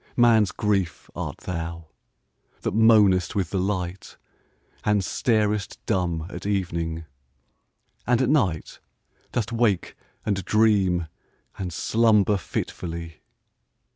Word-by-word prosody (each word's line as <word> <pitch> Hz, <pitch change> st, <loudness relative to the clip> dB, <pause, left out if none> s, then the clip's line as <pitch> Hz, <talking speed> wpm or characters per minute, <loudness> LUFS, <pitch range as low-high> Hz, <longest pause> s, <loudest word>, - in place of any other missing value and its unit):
Man's 115 Hz, -4 st, +5 dB
Grief 100 Hz, -6 st, -1 dB
art -, -, -5 dB
thou, 85 Hz, -1 st, -5 dB, 0.8 s
that -, -, -2 dB
moanest 105 Hz, -5 st, +5 dB
with 95 Hz, -5 st, -1 dB
the 95 Hz, -, 0 dB
light, 95 Hz, -1 st, -3 dB, 0.7 s
And 105 Hz, -2 st, +2 dB
starest 105 Hz, -1 st, 0 dB
dumb 85 Hz, -6 st, 0 dB
at 100 Hz, -, -6 dB
evening 85 Hz, -5 st, -2 dB, 0.5 s
— -, -, -42 dB
and 120 Hz, -1 st, +3 dB
at 130 Hz, -, +2 dB
night 95 Hz, -, 0 dB, 0.5 s
Dost 115 Hz, -1 st, -2 dB
wake 115 Hz, -6 st, +1 dB, 0.3 s
and 100 Hz, -2 st, 0 dB
dream 95 Hz, -4 st, +3 dB, 0.5 s
and 90 Hz, -2 st, -3 dB
slumber 105 Hz, +1 st, +3 dB
fitfully 85 Hz, -2 st, -5 dB
100 Hz, 105 wpm, -25 LUFS, 90-110 Hz, 0.8 s, Man's